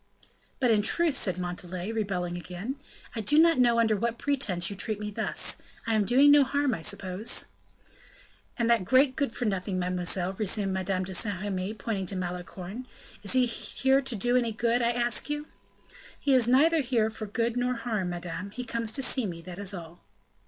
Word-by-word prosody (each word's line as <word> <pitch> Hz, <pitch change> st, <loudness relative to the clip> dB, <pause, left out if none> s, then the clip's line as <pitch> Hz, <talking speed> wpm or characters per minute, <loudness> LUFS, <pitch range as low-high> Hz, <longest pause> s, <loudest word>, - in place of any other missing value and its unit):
"But 250 Hz, -3 st, +3 dB
in 215 Hz, -2 st, +4 dB
truth," 335 Hz, +8 st, +3 dB
said 185 Hz, -9 st, +1 dB
Montalais, 180 Hz, +2 st, -5 dB
rebelling 190 Hz, -5 st, -2 dB
again, 180 Hz, +8 st, -5 dB, 0.4 s
"I 225 Hz, -, -1 dB
do 295 Hz, +9 st, +2 dB
not 330 Hz, -3 st, +6 dB
know 240 Hz, -2 st, +4 dB
under 220 Hz, -2 st, +3 dB
what 235 Hz, +3 st, -1 dB
pretense 220 Hz, -13 st, 0 dB
you 200 Hz, -, -3 dB
treat 210 Hz, +2 st, -2 dB
me 210 Hz, 0 st, -4 dB
thus. -, -, -1 dB, 0.3 s
I 225 Hz, -, 0 dB
am 215 Hz, -2 st, +2 dB
doing 270 Hz, +6 st, +6 dB
no 290 Hz, -1 st, +7 dB
harm, 285 Hz, -1 st, 0 dB
I 165 Hz, -, -4 dB
suppose?" 185 Hz, +5 st, -1 dB, 1.1 s
"And 235 Hz, -2 st, +1 dB
that 235 Hz, -4 st, +3 dB
great 260 Hz, +6 st, +4 dB
good 280 Hz, -6 st, 0 dB
for 245 Hz, +1 st, -4 dB
nothing, 190 Hz, -2 st, -1 dB
mademoiselle," 180 Hz, 0 st, -1 dB
resumed 195 Hz, -1 st, -1 dB
Madame 185 Hz, 0 st, -1 dB
de 190 Hz, +1 st, -6 dB
Saint 190 Hz, 0 st, 0 dB
Remy, 195 Hz, +1 st, -3 dB
pointing 200 Hz, -2 st, -3 dB
to 195 Hz, -, -1 dB
Malicorne, 185 Hz, +5 st, -6 dB, 0.3 s
"is 205 Hz, -, -1 dB
he 255 Hz, -1 st, +4 dB
here 265 Hz, +3 st, +1 dB
to 265 Hz, -3 st, -1 dB
do 245 Hz, +4 st, +1 dB
any 240 Hz, -2 st, +2 dB
good, 235 Hz, +2 st, +1 dB
I 235 Hz, -, +2 dB
ask 240 Hz, +2 st, -1 dB
you?" 295 Hz, +1 st, -3 dB, 0.7 s
"He 280 Hz, -, +2 dB
is 250 Hz, -3 st, +4 dB
neither 310 Hz, +6 st, +4 dB
here 235 Hz, -4 st, +1 dB
for 215 Hz, -1 st, -6 dB
good 230 Hz, +3 st, -1 dB
nor 250 Hz, 0 st, 0 dB
harm, 220 Hz, -6 st, -2 dB
madame; 175 Hz, +2 st, -5 dB
he 250 Hz, +5 st, -6 dB
comes 230 Hz, -2 st, -2 dB
to 270 Hz, -, +1 dB
see 255 Hz, -4 st, +1 dB
me, 170 Hz, -2 st, -7 dB
that 180 Hz, +1 st, -9 dB
is 200 Hz, -1 st, -4 dB
all." 170 Hz, -3 st, -9 dB
220 Hz, 195 wpm, -28 LUFS, 185-250 Hz, 1.1 s, no